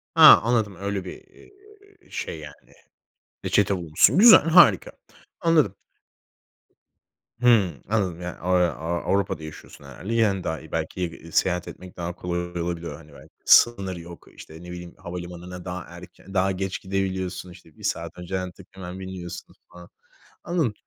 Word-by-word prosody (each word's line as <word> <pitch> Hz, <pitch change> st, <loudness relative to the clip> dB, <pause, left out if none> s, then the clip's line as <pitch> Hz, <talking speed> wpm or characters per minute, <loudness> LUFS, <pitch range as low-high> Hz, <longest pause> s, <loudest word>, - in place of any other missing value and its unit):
Ha -, -, +10 dB
anladım 110 Hz, -5 st, 0 dB
öyle 100 Hz, 0 st, -4 dB
bir, -, -, -7 dB
eee, -, -, -20 dB, 0.6 s
şey 80 Hz, -, -5 dB
yani. 75 Hz, -1 st, -13 dB, 0.7 s
Reçete 100 Hz, -1 st, +2 dB
bulmuşsun. 85 Hz, -, +3 dB
Güzel, 230 Hz, +1 st, +10 dB
harika. 165 Hz, -, +5 dB, 0.5 s
Anladım. 155 Hz, -, +2 dB, 1.6 s
Hı 100 Hz, -, +3 dB
anladım 95 Hz, -6 st, -1 dB
yani, 90 Hz, -1 st, -6 dB
aaa, 90 Hz, 0 st, +2 dB
aaa, 80 Hz, +4 st, -4 dB
Avrupa'da 95 Hz, -4 st, -1 dB
yaşıyorsun 75 Hz, -2 st, -11 dB
herhâlde. 90 Hz, -, -7 dB
Yani 105 Hz, -5 st, +1 dB
daha 80 Hz, 0 st, -3 dB
iyi 80 Hz, -, -15 dB
belki, 80 Hz, +3 st, -3 dB
eee, 85 Hz, -2 st, -3 dB
iii, 85 Hz, 0 st, -13 dB
seyahat 90 Hz, 0 st, +1 dB
etmek 90 Hz, -1 st, -11 dB
daha 85 Hz, 0 st, -4 dB
kolay 85 Hz, -1 st, -4 dB
olabiliyor 85 Hz, -1 st, -4 dB
hani 75 Hz, -2 st, -16 dB
belki. -, -, -16 dB
Sınır 100 Hz, -6 st, +5 dB
yok. 85 Hz, 0 st, -12 dB
İşte 80 Hz, +2 st, -12 dB
ne 90 Hz, -, -9 dB
bileyim 90 Hz, -1 st, -9 dB
havalimanına 90 Hz, 0 st, -8 dB
daha 90 Hz, -1 st, -5 dB
erken, 90 Hz, +2 st, -13 dB
daha 95 Hz, 0 st, +2 dB
geç 95 Hz, 0 st, -3 dB
gidebiliyorsun. 95 Hz, -2 st, -3 dB
İşte 85 Hz, -3 st, -17 dB
1 -, -, -15 dB
saat 85 Hz, -1 st, -3 dB
önceden 90 Hz, +1 st, -4 dB
tık 95 Hz, -, -16 dB
hemen 95 Hz, -1 st, -8 dB
biniyorsun 95 Hz, -2 st, -8 dB, 0.2 s
falan. 90 Hz, 0 st, -14 dB, 0.5 s
Anladım. 165 Hz, -11 st, 0 dB
90 Hz, 150 wpm, -24 LUFS, 85-95 Hz, 1.6 s, Ha